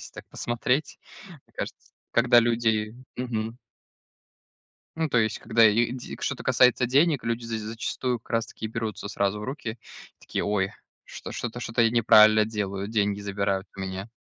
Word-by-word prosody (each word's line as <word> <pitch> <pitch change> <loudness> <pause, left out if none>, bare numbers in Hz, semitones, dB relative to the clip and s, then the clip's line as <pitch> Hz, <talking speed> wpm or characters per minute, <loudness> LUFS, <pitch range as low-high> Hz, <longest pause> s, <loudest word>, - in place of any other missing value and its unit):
Если - - -11
так - - -11
посмотреть, 125 +4 -1 0.3
мне 160 -7 -17
кажется, - - -7 0.2
когда 120 0 +5
люди 115 -2 +1 0.2
Мгм. 115 -2 -3 1.4
Ну, 160 -1 0
то 120 - +2
есть, 110 -1 +1
когда 115 -1 +4
лиде 120 +3 -1
что-то 140 - -3
касается 125 0 +4
денег, 145 +3 +3
люди 115 0 -2
з 115 -1 -3
зачастую 115 +3 -3
как - - -25
раз 115 -1 0
таки 110 - -7
берутся 110 -2 -4
сразу 100 +1 -1
в 105 - -6
руки 130 -4 -4
и - - -17
такие: - - -3
"Ой, 100 -2 0 0.3
что-то 120 0 -6
что-то 120 0 0
я 115 - +4
неправильно 110 -2 +6
делаю, 100 -2 -3
деньги 105 -2 0
забирают 100 -1 -2
у 95 - -7
меня". 95 +2 -5
115 Hz, 160 wpm, -26 LUFS, 105-120 Hz, 1.4 s, неправильно